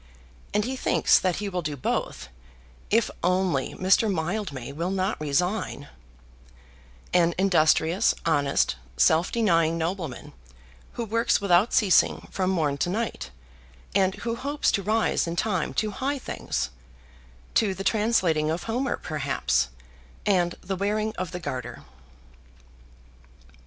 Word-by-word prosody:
And 210 0 +1
he 260 +2 -3
thinks - - +3
that 185 -2 0
he 205 - -3
will 180 -2 -2
do 150 -3 -4
both, 125 - -3 0.6
if 225 +1 +2
only 180 -6 +1
Mr. 195 +3 +3
Mildmay 160 - -3
will 165 +5 -3
not 190 -2 -1
resign; 155 0 -1 1.2
an 170 -1 +3
industrious, 175 0 +3
honest, 145 - +1 0.2
self 160 - +3
denying 165 -8 +2
nobleman, 165 -4 -4 0.6
who 235 - -3
works 230 +2 +1
without 200 +2 +3
ceasing 205 -7 +3
from 185 -1 0
morn 150 -6 0
to 175 - 0
night, 220 - -3 0.6
and 190 0 +2
who 230 - 0
hopes 285 +4 0
to 200 - 0
rise 215 -2 +1
in 170 - -3
time 185 -3 0
to 215 0 0
high 270 +7 -2
things, 65 - -3 0.8
to 200 -4 +2
the 195 - -5
translating 190 -8 +2
of 165 +2 -2
Homer, 245 +4 -1
perhaps, 65 - -1 0.6
and 175 -3 +2
the 190 +1 -3
wearing 210 +3 -1
of 185 - -3
the 180 - -5
Garter. 125 -7 -6
185 Hz, 130 wpm, -26 LUFS, 160-210 Hz, 1.2 s, thinks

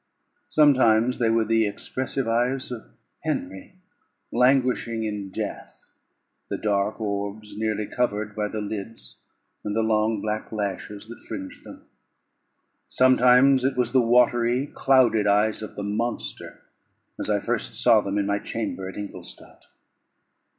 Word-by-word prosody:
Sometimes 125 -5 +4
they 115 -2 +2
were 115 0 +2
the 115 0 +2
expressive 130 +5 -3
eyes 125 +3 0
of 120 -3 -6 0.4
Henry, 265 - -4 0.5
languishing 125 -2 +2
in 105 -2 -4
death, - - -7 0.6
the - - -2
dark 105 0 -1
orbs 100 0 -4
nearly 110 0 -1
covered 105 -3 -2
by 105 -1 -1
the 110 +1 -5
lids, 105 +2 -6 0.5
and 105 0 -3
the 115 - +1
long 110 0 +1
black 105 +1 -4
lashes 105 0 -4
that 120 - -11
fringed 95 -4 -7
them; - - -13 1.0
sometimes 130 +1 +5
it 130 0 0
was 125 -1 +1
the 130 0 +4
watery, 120 +1 +3
clouded 120 -6 +3
eyes 105 +2 +2
of 110 - -8
the 100 - -5
monster, 110 +4 -4 0.6
as - - -3
I - - +2
first - - -2
saw 115 -3 +5
them 100 0 -3
in 100 - +1
my 100 0 0
chamber 100 -5 -4
at - - -10
Ingolstadt. 105 -1 -8
110 Hz, 135 wpm, -24 LUFS, 105-125 Hz, 1.0 s, sometimes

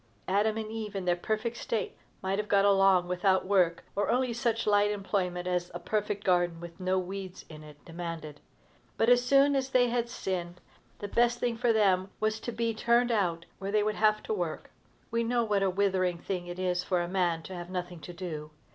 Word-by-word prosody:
Adam 210 +3 +2
and 220 -1 -4
Eve, 215 -2 -5
in 190 -2 -3
their 175 -1 +3
perfect 215 +6 -2
state, 230 -2 -3 0.3
might 190 +1 0
have 210 - -2
got 200 -1 +4
along 195 -3 +4
without 185 +1 +2
work, 180 -4 +2
or 205 +1 0
only 250 +1 +1
such 235 -1 0
slight 205 0 +3
employment 195 -3 -2
as 180 -1 -1
a - - -3
perfect 205 +2 -2
garden, 175 -2 +2
with 170 +1 -10
no 185 0 +1
weeds 185 0 -5
in 155 -1 -10
it, 150 -1 -13
demanded. 165 -3 -6 0.6
But, 225 - +3
as 245 0 +5
soon 275 +2 +4
as 265 -1 0
they 250 -2 +3
had 240 0 -1
sinned, 180 -6 -4 0.4
the 205 - -5
best 240 +3 +2
thing 240 -1 0
for 235 +1 +2
them 195 -4 +3
was 215 0 0
to 240 - -5
be 230 0 -1
turned 235 +2 +2
out 175 -6 0
where 195 +1 -4
they 210 0 +3
would 215 0 0
have 215 0 +2
to - - -2
work. 425 - -4 0.4
We 230 0 +1
know 240 +1 +1
what 205 -3 +1
a 195 - +3
withering 185 -2 +1
thing 175 0 -4
it 175 0 -6
is 180 -1 0
for 180 -1 0
a - - -4
man 175 -3 0
to 190 - -8
have 175 -1 -7
nothing 180 -2 -5
to 175 - -9
do. 165 -4 -6
195 Hz, 215 wpm, -29 LUFS, 180-220 Hz, 0.6 s, as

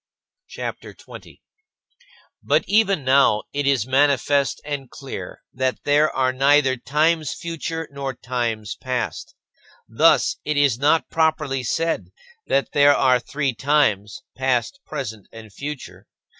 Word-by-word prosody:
CHAPTER - - -7
XX - - -19
26. - - -13 1.0
But - - +1
even 200 -6 +2
now 130 -5 +3
it 145 0 -1
is 135 -6 +2
manifest 140 +1 +2
and 140 -3 -5
clear 135 -3 -8
that 130 0 -2
there 150 +1 +3
are 130 -1 0
neither 135 0 +3
times 155 +4 0
future 165 -1 -5
nor 140 -2 -5
times 120 -4 -3
past. 125 -2 -4 0.5
Thus - - +3
it 150 -1 -2
is 140 -5 +2
not 150 +3 +2
properly 155 -4 0
said 165 +7 -2 0.4
that 135 - 0
there 145 0 +5
are 130 -2 +3
three 140 +1 -2
times, 110 -7 0
past, 130 - -1
present, 110 -9 -6
and 110 -2 -12
future. 145 +2 -8
140 Hz, 130 wpm, -22 LUFS, 130-150 Hz, 1.0 s, there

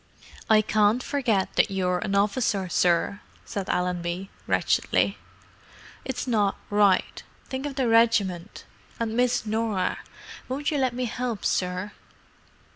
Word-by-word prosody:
"I 215 -1 +6
can't 215 +3 +2
forget 235 -9 0
that - - +4
you're 180 -2 0
an 195 +2 -2
officer, 200 -1 +1
sir," 175 +3 +1 0.2
said 195 -2 -5
Allenby, 180 +1 -2 0.2
wretchedly. - - +1 0.8
"It's 265 - -4
not 210 -5 +1
right: 205 -2 +3 0.3
think 265 +2 -3
of 280 - -6
the 265 -3 +1
regiment. 215 -5 +2 0.3
And 225 -1 -2
Miss 245 -1 +1
Norah. 215 -3 -1 0.5
Won't 285 +4 -1
you 295 - 0
let 255 -2 0
me 250 -3 -3
'elp 240 -4 -2
sir?" 185 +2 -1
210 Hz, 125 wpm, -26 LUFS, 190-240 Hz, 0.8 s, I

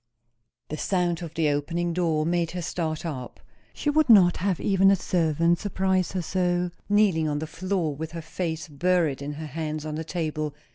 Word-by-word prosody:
The 155 - -4
sound 180 -3 0
of 165 -2 -7
the 160 -2 +2
opening 165 +4 -1
door 165 -3 +1
made 170 0 +1
her 180 - -3
start 160 -1 -3
up. 130 -6 -6 0.3
She 295 - -1
would 310 -2 +2
not 185 -6 +7
have 190 -1 0
even 195 -1 +4
a 195 - +6
servant 170 -2 +1
surprise 190 -3 0
her 185 -2 -1
so; 180 0 0 0.2
kneeling 200 -6 +3
on 145 - -1
the 155 - -3
floor 170 -2 -2
with 160 +2 -6
her 165 - -5
face 160 0 -4
buried 160 -2 +1
in 145 +1 -4
her 155 +2 -6
hands 155 +1 -4
on 155 - -4
the 160 +1 -3
table. 155 -3 -3
170 Hz, 190 wpm, -26 LUFS, 155-180 Hz, 0.3 s, not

